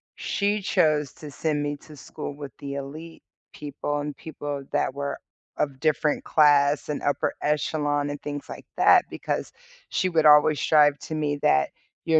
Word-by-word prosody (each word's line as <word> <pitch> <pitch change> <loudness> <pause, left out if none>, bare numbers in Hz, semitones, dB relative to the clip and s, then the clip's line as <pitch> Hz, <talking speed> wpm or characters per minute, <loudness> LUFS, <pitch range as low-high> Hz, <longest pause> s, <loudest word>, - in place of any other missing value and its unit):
she 205 +1 -1
chose 155 -8 +1
to 150 -2 -10
send 150 0 -1
me 145 0 -3
to 150 +2 -15
school 140 - -7
with 145 -2 -8
the 140 -1 -6
elite 155 +4 -8 0.3
people, 145 0 -4
and 145 0 -4
people 145 -3 -6
that - - +1
were 140 0 -4 0.4
of 135 -3 -2
different 150 0 0
class, 145 -1 +4
and 150 - -2
upper 145 - 0
echelon, 145 -1 0
and 145 0 -6
things 145 -1 -6
like - - -9
that, - - +6
because - - -4 0.4
she 185 - 0
would 160 -3 +2
always 150 0 +6
strive 145 -2 +4
to 155 - -6
me 150 -2 -1
that 70 0 +3 0.3
your 160 -1 +4
145 Hz, 165 wpm, -25 LUFS, 145-155 Hz, 0.4 s, that